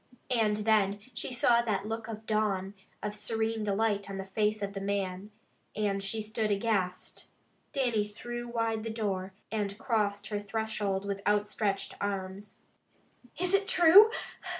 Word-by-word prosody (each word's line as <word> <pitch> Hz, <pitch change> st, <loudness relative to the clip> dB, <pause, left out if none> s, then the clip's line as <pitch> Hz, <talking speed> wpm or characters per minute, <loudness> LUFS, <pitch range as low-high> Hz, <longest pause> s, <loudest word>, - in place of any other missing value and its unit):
And 220 Hz, -4 st, +3 dB
then 210 Hz, -2 st, +3 dB, 0.2 s
she 240 Hz, -, -4 dB
saw 240 Hz, -1 st, +4 dB
that 210 Hz, -4 st, -1 dB
look 225 Hz, 0 st, -4 dB
of 220 Hz, -1 st, -7 dB
dawn, 205 Hz, -3 st, 0 dB, 0.3 s
of 210 Hz, 0 st, -2 dB
serene 220 Hz, +1 st, -1 dB
delight 205 Hz, -1 st, 0 dB
on 195 Hz, -, -4 dB
the 195 Hz, -, -4 dB
face 210 Hz, +2 st, 0 dB
of 200 Hz, 0 st, -3 dB
the 195 Hz, -, -4 dB
man, 195 Hz, 0 st, -2 dB, 0.5 s
and 200 Hz, -2 st, 0 dB
she 215 Hz, +2 st, -3 dB
stood 215 Hz, 0 st, -1 dB
aghast. 200 Hz, -3 st, -1 dB, 0.4 s
Dannie 240 Hz, -6 st, +1 dB
threw 240 Hz, +3 st, -6 dB
wide 230 Hz, -2 st, -1 dB
the 225 Hz, -, -4 dB
door, 195 Hz, -4 st, -2 dB, 0.2 s
and 205 Hz, -2 st, -2 dB
crossed 205 Hz, -4 st, 0 dB
her 210 Hz, -1 st, -1 dB
threshold 205 Hz, -2 st, -2 dB
with 200 Hz, 0 st, -3 dB
outstretched 205 Hz, -1 st, +1 dB
arms. 195 Hz, 0 st, -4 dB, 0.7 s
"Is 360 Hz, +2 st, +1 dB
it 395 Hz, 0 st, +3 dB
true?" 365 Hz, +5 st, +8 dB
210 Hz, 150 wpm, -30 LUFS, 200-225 Hz, 0.7 s, true